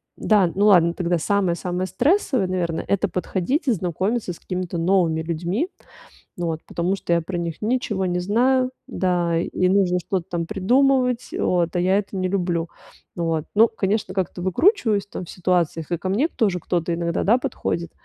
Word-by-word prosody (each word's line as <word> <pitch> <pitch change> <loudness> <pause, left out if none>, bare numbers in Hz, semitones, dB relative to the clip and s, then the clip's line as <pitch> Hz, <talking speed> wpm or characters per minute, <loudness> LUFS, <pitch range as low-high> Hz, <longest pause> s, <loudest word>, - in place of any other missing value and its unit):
да, 200 -5 +3
ну 205 +2 +3
ладно, 170 -4 +5
тогда 175 -1 0
самое-самое 180 0 -1
стрессовое, 265 - +1
наверное, 175 -3 -2
это 200 +1 +1
подходить 190 - -2
и - - +4
знакомиться 190 +3 -1
с - - -14
какими-то 180 -1 -4
новыми 170 -2 +2
людьми. 175 - -2 0.7
Ну 175 -1 -2
вот, 160 -1 -3
потому 175 +3 -1
что 175 - -2
я 170 - +2
про 175 +2 -5
них 170 -2 -4
ничего 215 -4 -1
не 180 -1 0
знаю, 255 +7 +2 0.2
да, 175 -3 0
и 180 +1 0
нужно 185 -2 +3
что-то 185 +1 -3
там 170 -1 -2
придумывать, 250 +6 +2
вот, 175 -2 0
а - - +2
я 185 +2 +3
это 200 -1 -4
не 185 -1 0
люблю. 175 -3 -1 0.5
Ну 170 - -2
вот, 160 -2 -1
ну, 225 +2 +7
конечно, 200 -1 -1
как-то 185 -2 -2
выкручиваюсь, 220 - +2
там, 185 - -6
в - - -15
ситуациях, 175 -3 -1
и 170 - +1
ко 185 - -4
мне 225 +11 +2
тоже 200 - 0
кто-то, 170 0 -1
иногда, 170 +1 -1
да, 225 +5 +4
подходит. 170 -8 -3
185 Hz, 180 wpm, -22 LUFS, 170-205 Hz, 0.7 s, ну